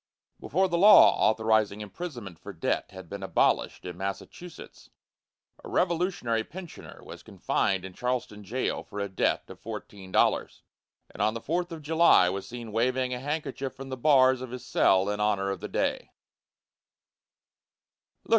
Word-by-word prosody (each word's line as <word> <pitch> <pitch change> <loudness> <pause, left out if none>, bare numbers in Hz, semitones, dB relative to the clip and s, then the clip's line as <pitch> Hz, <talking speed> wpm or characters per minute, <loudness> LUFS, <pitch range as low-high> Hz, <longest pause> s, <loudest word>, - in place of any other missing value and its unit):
Before 190 +5 +1
the 170 -1 -1
law 210 +3 +8
authorizing 110 -2 +1
imprisonment 105 - -8
for - - -9
debt - - -2
had 95 -3 -11
been 100 +3 -7
abolished 95 - 0
in 90 -1 -7
Massachusetts, 100 - -8 0.7
a - - -9
revolutionary 170 -10 0
pensioner 175 +6 -11
was - - -10
confined 95 -1 -1
in 95 - -9
Charlestown 125 -2 -3
jail 125 +6 -2
for 105 -2 -9
a 100 - -1
debt 95 - -1
of - - -12
fourteen 95 -2 -9
dollars, - - +1 0.5
and - - -7
on 110 +2 +1
the - - -3
fourth 175 +7 -2
of 160 -2 -8
July 160 - +5
was 95 +1 -5
seen 120 -2 -8
waving 125 +3 0
a 125 - -4
handkerchief 140 -1 -4
from 135 0 -9
the 130 - -3
bars 130 -1 +4
of 130 - -6
his 125 0 -8
cell 95 +1 +3
in 105 0 -2
honor 100 -2 +1
of 95 - -4
the - - -6
day. - - -1
120 Hz, 155 wpm, -27 LUFS, 100-145 Hz, 0.7 s, law